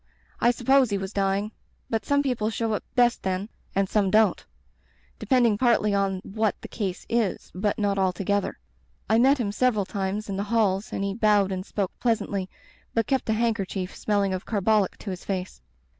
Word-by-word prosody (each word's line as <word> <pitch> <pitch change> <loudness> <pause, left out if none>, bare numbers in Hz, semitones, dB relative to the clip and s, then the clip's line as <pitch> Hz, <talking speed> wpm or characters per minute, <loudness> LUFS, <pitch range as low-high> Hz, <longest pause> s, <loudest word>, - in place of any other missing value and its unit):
I 240 - +4
supposed 255 +1 +3
he 200 - 0
was 195 +1 -5
dying. 200 +1 0 0.4
But 225 -1 -2
some 285 0 +3
people 245 -6 0
show 225 0 -1
up 210 - -2
best 240 -2 +3
then 190 +2 -2
— - - -35
and 195 0 +2
some 200 -1 +1
don't; 215 +2 +3 0.8
depending 240 -6 +3
partly 230 -4 +3
on 195 -2 0
what 215 +1 -1
the - - -9
case 195 -5 -4
is, 230 -4 -1
but 200 +3 -1
not 200 -2 0
altogether. 195 +2 0 0.5
I 220 +1 +3
met 270 +4 +5
him 220 -6 -1
several 215 -2 +1
times 200 +2 -3
in 195 -1 -3
the 200 - -2
halls 210 -3 +1
and 195 - -2
he 200 0 -1
bowed 205 -2 +3
and 185 -1 -3
spoke 195 -1 -2
pleasantly, 205 -5 -1 0.5
but 225 -1 +2
kept 265 -4 -1
a - - +3
handker 220 -3 0
chief 185 -1 -5
smelling 200 -2 0
of 185 - -3
carbolic 210 -1 +1
to 200 - -6
his 180 - -7
face. 185 - -4
205 Hz, 190 wpm, -25 LUFS, 195-225 Hz, 0.8 s, met